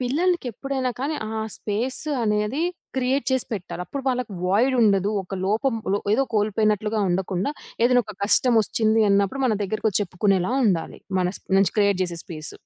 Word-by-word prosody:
పిల్లలకెప్పుడైనా 270 Hz, -, -1 dB
కానీ 295 Hz, +3 st, -1 dB
ఆ 220 Hz, 0 st, -3 dB, 0.2 s
స్పేస్ 225 Hz, +5 st, -2 dB, 0.2 s
అనేది 210 Hz, +7 st, 0 dB, 0.3 s
క్రియేట్ 260 Hz, +2 st, +1 dB
చేసి 260 Hz, -2 st, +1 dB
పెట్టాలి. 180 Hz, -3 st, -4 dB
అప్పుడు 280 Hz, -, -5 dB
వాళ్ళకి 250 Hz, -4 st, -2 dB
వాయిడ్ 235 Hz, +8 st, +3 dB
ఉండదు. 200 Hz, -1 st, +3 dB
ఒక 190 Hz, +1 st, -7 dB
లోపం 230 Hz, +5 st, +1 dB, 0.2 s
లో 205 Hz, -, +2 dB, 0.2 s
ఏదో 270 Hz, -, +3 dB
కోల్పోయినట్లుగా 215 Hz, 0 st, +1 dB
ఉండకుండా 190 Hz, +6 st, -1 dB, 0.3 s
ఏదైనా 245 Hz, 0 st, +4 dB
ఒక 210 Hz, -, -9 dB
కష్టం 235 Hz, +3 st, +4 dB
ఒచ్చింది 220 Hz, +1 st, +2 dB
అన్నప్పుడు 200 Hz, +7 st, +1 dB
మన 220 Hz, -, +2 dB
దగ్గరకొచ్చి 215 Hz, 0 st, 0 dB
చెప్పుకునేలా 190 Hz, +2 st, 0 dB
ఉండాలి. 165 Hz, -5 st, -1 dB, 0.2 s
మన 180 Hz, -, +1 dB
స్ప్ -, -, -36 dB
నుంచి 195 Hz, -3 st, +3 dB
క్రియేట్ 200 Hz, -2 st, +3 dB
జేసే 175 Hz, -2 st, -3 dB
స్పేస్. 155 Hz, -3 st, -7 dB
215 Hz, 155 wpm, -23 LUFS, 195-250 Hz, 0.3 s, ఏదైనా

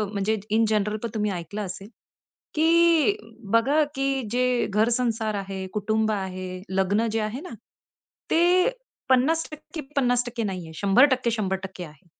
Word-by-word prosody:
अ, -, -, +1 dB
म्हणजे 210 Hz, +2 st, 0 dB
in 225 Hz, +1 st, +3 dB
general 210 Hz, 0 st, +1 dB
पण 235 Hz, -, -3 dB
तुम्ही 210 Hz, -1 st, 0 dB
ऐकलं 180 Hz, +4 st, -5 dB
असेल, 195 Hz, +2 st, -8 dB, 0.7 s
की 335 Hz, +3 st, +4 dB, 0.4 s
बघा 270 Hz, +7 st, +4 dB
की 270 Hz, 0 st, 0 dB
जे 250 Hz, 0 st, +1 dB
घर-संसार 225 Hz, 0 st, +1 dB
आहे, 195 Hz, -1 st, -5 dB
कुटुंब 215 Hz, +1 st, 0 dB
आहे, 185 Hz, -2 st, -4 dB
लग्न 195 Hz, +4 st, +1 dB
जे 225 Hz, -, 0 dB
आहे 215 Hz, +5 st, -3 dB
ना, 365 Hz, -, -9 dB, 0.8 s
ते 355 Hz, +4 st, +4 dB, 0.4 s
50%-50% 270 Hz, -4 st, 0 dB
नाहीये. 180 Hz, -5 st, -5 dB
100%-100% 200 Hz, -, +2 dB
आहे. 155 Hz, 0 st, -15 dB
220 Hz, 125 wpm, -25 LUFS, 195-265 Hz, 0.8 s, की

